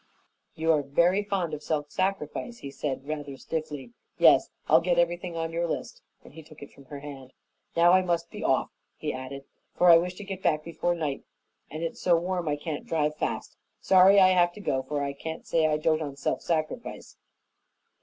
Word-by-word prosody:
"You 160 +1 +2
are 155 -2 +3
very 170 +8 +2
fond 195 -5 -2
of 150 - -4
self 150 -1 -2
sacrifice," 195 +4 -2
he 140 - -8
said, 135 -1 -4
rather 145 -3 -5
stiffly. 150 -6 -5 0.3
"Yes, - - +6 0.2
I'll 160 +2 +6
get 175 0 +1
everything 175 0 0
on 165 0 -2
your 170 +1 0
list," - - -5 0.2
and - - -15
he 160 - -10
took 155 -1 -14
it 140 - -12
from 140 - -17
her 140 +1 -9
hand. 135 -3 -10 0.4
"Now 170 +1 +6
I 185 +1 +6
must 170 -2 -1
be - - -7
off," - - +1 0.3
he - - -3
added, 130 +1 -7 0.3
"for 180 -1 +6
I 165 - +9
wish 180 +1 -3
to 205 - -8
get 195 -1 -6
back 155 -4 +1
before 175 +1 -1
night, 150 -5 -3 0.5
and 155 +2 -6
it's 165 - -4
so 175 - +4
warm 175 0 -2
I 150 - +1
can't 150 0 -6
drive 150 -2 0
fast. - - -3 0.2
Sorry 190 +1 +6
I 185 -1 +7
have 175 -2 +4
to - - -11
go, 135 -10 -1
for 145 +2 -3
I 140 0 -2
can't 160 +3 -7
say 160 -1 +2
I 150 -1 +1
dote 155 +1 +1
on 145 -3 -5
self 140 - -2
sacrifice." 165 +8 -3
160 Hz, 205 wpm, -27 LUFS, 145-175 Hz, 0.5 s, I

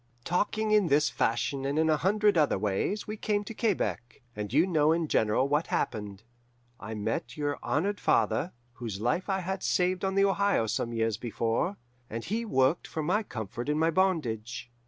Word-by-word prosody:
"Talking 210 +5 0
in 210 -4 +4
this 150 0 +3
fashion 135 +4 0
and 140 +2 -1
in 160 0 +3
a 155 - +4
hundred 205 +4 +2
other 150 -9 +3
ways, 105 - -1
we 215 +1 -5
came 205 -1 0
to 215 - -7
Quebec. 190 - -2
And 105 -1 -4
you 155 +7 +4
know 155 -4 +3
in 165 -1 +1
general 110 +1 +2
what 150 +3 +1
happened. 105 -2 -3 0.6
I 110 0 -6
met 105 +7 -3
your 145 -1 -2
honoured 200 +7 -1
father, 110 - +1 0.2
whose 115 -6 -6
life 125 - -1
I 190 -1 0
had 190 +1 -3
saved 180 +1 +1
on 190 0 0
the 195 0 +5
Ohio 200 - +2
some 115 +2 -2
years 115 -2 0
before, 120 - -1 0.3
and 115 +1 -5
he 230 +3 -2
worked 135 -4 +2
for 160 - -4
my 185 +8 +1
comfort 120 - -6
in 150 - +1
my 160 +1 +2
bondage. 120 - -1
150 Hz, 185 wpm, -29 LUFS, 115-190 Hz, 0.6 s, the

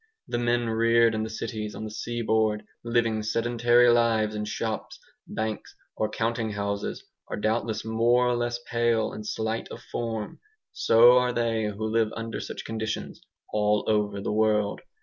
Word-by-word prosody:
The 120 - -2
men 120 0 +1
reared 115 +1 +4
in 110 - -1
the 110 - -3
cities 110 -1 -5
on - - -6
the 110 - -5
seaboard, 110 -2 0 0.2
living 115 -2 +1
sedentary 120 +2 +3
lives 115 -2 +2
in 105 0 -3
shops, 110 +1 -4 0.3
banks, 110 -1 -4 0.2
or 110 - -1
counting 115 -1 -1
houses, 100 0 -3 0.2
are - - -4
doubtless 110 0 -1
more 120 +2 +3
or 125 - +2
less 120 0 -1
pale 115 -1 +1
and 105 - -6
slight 110 +1 -2
of - - -9
form. 115 -3 -4 0.3
So 120 +2 +6
are 125 0 +1
they 115 -2 0
who 105 +1 -3
live 110 0 +1
under 115 0 -4
such - - -6
conditions 110 -1 -4 0.3
all 105 0 +2
over 105 -2 +1
the 100 - -2
world. 105 -1 +1
110 Hz, 160 wpm, -26 LUFS, 110-115 Hz, 0.3 s, So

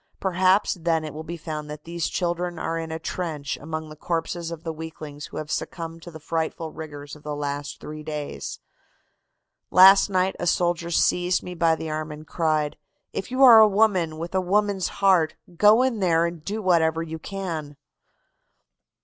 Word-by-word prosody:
Perhaps 185 0 +2
then 165 -1 +1
it 155 - -6
will 155 - -6
be 170 +2 -6
found 155 -2 -6
that 150 0 -8
these 170 -1 -3
children 175 -1 -2
are 165 +1 -2
in 165 -1 -5
a 160 - -3
trench 160 -4 -4
among 155 +1 -5
the 155 - -10
corpses 165 +1 -3
of 165 -1 -7
the 165 - -3
weaklings 155 -2 -8
who - - -9
have 155 -1 -5
succumbed 165 -1 -4
to 175 - -10
the 160 -2 -10
frightful 160 0 -3
rigors 145 -2 -8
of 150 - -15
the 150 0 -4
last 145 0 -4
three 155 0 -8
days. 150 -1 -5 1.1
"Last 195 +2 +8
night 185 0 +1
a 175 - -2
soldier 175 -1 +1
seized 180 +1 +2
me 180 - -6
by 165 -2 +3
the 160 -1 -5
arm 155 0 -3
and 150 +1 -9
cried: 155 -2 0 0.4
'If - - -4
you 255 +2 +2
are 235 -4 +10
a 220 - +8
woman 195 -6 +2
with 170 +3 -6
a 190 - +2
woman's 200 0 +1
heart, 185 -5 +2 0.2
go 210 +7 +6
in 255 -4 0
there 170 -3 +3
and 170 -2 -5
do 210 +4 -4
whatever 165 -3 +2
you 160 0 -6
can. 160 -6 -5
165 Hz, 185 wpm, -24 LUFS, 155-185 Hz, 1.1 s, are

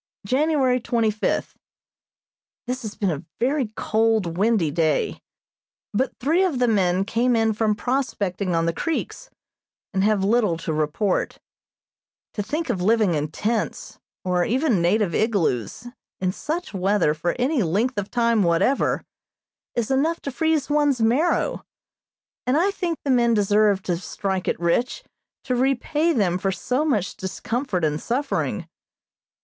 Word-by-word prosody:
January 265 +1 +2
twenty 230 -2 +1
fifth: 210 - -2 1.1
This 255 +1 -3
has 215 -3 -6
been 195 -4 0
a 150 0 -4 0.2
very 265 +1 +1
cold, 220 -7 +1
windy 200 -5 +2
day, 160 -2 0 0.7
but 255 +6 -1
three 325 +8 +2
of 350 -8 0
the 245 0 +2
men 190 -3 +2
came 240 +3 +1
in 225 -1 +2
from 215 0 +1
prospecting 205 -7 -1
on 165 0 +1
the 170 - 0
creeks, 330 - -3 0.6
and 190 0 +1
have 210 -2 +2
little 210 -4 +2
to 160 -1 -3
report. 155 +6 0 1.0
To 210 - -2
think 310 +10 -2
of 185 - -3
living 215 -1 +3
in 150 -1 -1
tents, 215 +8 -3 0.3
or 180 -1 +2
even 245 - +1
native 185 +1 +2
igloos, 210 - 0 0.3
in 185 -1 0
such 315 - -4
weather 195 -4 +2
for 165 +3 -2
any 260 +2 +1
length 210 +7 0
of 200 - -5
time 235 -2 +2
whatever, 180 +9 +2 0.7
is 235 +1 -1
enough 315 +5 +1
to 280 - -4
freeze 315 0 0
one's 290 -3 +2
marrow, 250 +10 +1 0.8
and 255 +3 +3
I 375 +5 +3
think 350 -5 -2
the 280 - 0
men 235 -2 +3
deserve 205 -1 +3
to 175 -2 -1
"strike 190 +1 -3
it - - 0
rich" 175 +9 0 0.4
to 260 - -2
repay 275 +6 +1
them 185 - +1
for 195 +1 0
so 250 - -1
much 210 - 0
discomfort 190 - -2
and 150 0 -1
suffering. 275 +4 -2
220 Hz, 145 wpm, -23 LUFS, 185-260 Hz, 1.1 s, living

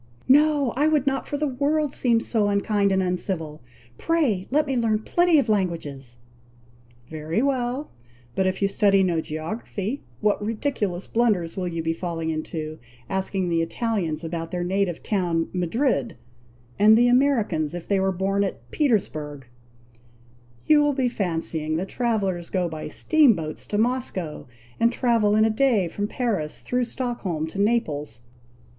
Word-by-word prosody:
"No! 290 -1 +4
I 290 +4 +3
would 300 -3 +2
not 270 -1 -1
for 290 - -2
the 300 - 0
world 290 +2 0
seem 235 -3 +2
so 220 -3 +1
unkind 200 0 +1
and 190 0 +2
uncivil. 175 -4 -3 0.4
Pray, 275 - +1
let 300 +3 +2
me 270 -2 -2
learn 220 -3 +1
plenty 350 +3 +3
of 275 - +2
languages." 165 - -2 1.0
"Very 160 +8 -1
well! 265 +1 -1 0.4
but 190 +6 +1
if 185 +2 -1
you - - +4
study 195 -1 +3
no 170 -3 +1
geography, 195 - -4 0.2
what 210 -1 +1
ridiculous 210 -5 -2
blunders 210 -8 +1
you 190 - -3
will 180 - -1
be 165 0 0
falling 165 -1 -3
into! 155 0 -5 0.3
asking 190 -1 -1
the 165 -1 +1
Italians 170 -3 -2
about 165 0 -4
their 175 +1 -3
native 185 -1 -1
town 175 -5 0
Madrid, 180 - 0 0.6
and 215 +2 +7
the 240 +1 +5
Americans 230 - +2
if 175 - -7
they 200 -1 +2
were 190 0 +1
born 195 +2 0
at 195 - -5
Petersburgh. 155 - -1 1.2
You 305 -1 +5
will 295 0 +2
be 260 -2 +1
fancying 165 -6 -2
that 185 +3 -3
travellers 195 -8 -1
go 180 -2 0
by 160 -2 -6
steam 285 - +4
boats 155 -2 -6
to 205 - -2
Moscow, 220 - -2 0.3
and 230 +1 +4
travel 230 -4 +2
in 215 0 +5
a 220 - +2
day 220 -5 +2
from 205 +5 -3
Paris, 210 -11 -2
through 250 0 0
Stockholm 230 -11 -3
to 160 +5 -7
Naples. 150 - 0
200 Hz, 155 wpm, -24 LUFS, 170-245 Hz, 1.2 s, and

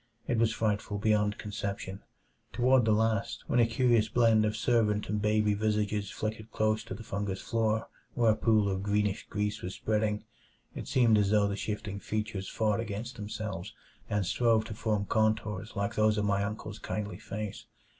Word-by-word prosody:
It 120 - +1
was 115 -1 +3
frightful 105 -1 -1
beyond 105 0 +2
conception; 100 -2 -5 0.5
toward 125 0 +4
the 110 - +3
last, 110 -1 +1
when 120 - +1
a 115 - +5
curious 115 -2 +3
blend 115 -1 +4
of 105 0 -1
servant 110 -3 +2
and 105 0 0
baby 105 0 +2
visages 105 -1 0
flickered 110 +1 -4
close 110 0 +1
to 95 - -6
the 115 - -9
fungous 100 -2 -3
floor 110 -1 0 0.3
where 115 -2 +4
a - - +2
pool 110 -2 +3
of 95 -1 -1
greenish 105 +1 0
grease 105 0 -2
was 90 - -5
spreading, 105 -1 0 0.5
it - - -7
seemed 115 -4 +4
as 100 -1 +2
though 105 -1 +4
the 100 - -2
shifting 105 -1 -4
features 105 -2 -3
fought 110 -2 +1
against 115 +2 -4
themselves 105 -3 -5 0.3
and 105 -2 0
strove 110 +3 +2
to 110 - -6
form 105 -1 -1
contours 110 -1 0
like 100 -1 -1
those 110 0 +3
of 105 - +1
my 100 -1 +1
uncle's 105 +1 -5
kindly 105 -1 -4
face. 105 -1 -6
105 Hz, 175 wpm, -30 LUFS, 105-110 Hz, 0.5 s, a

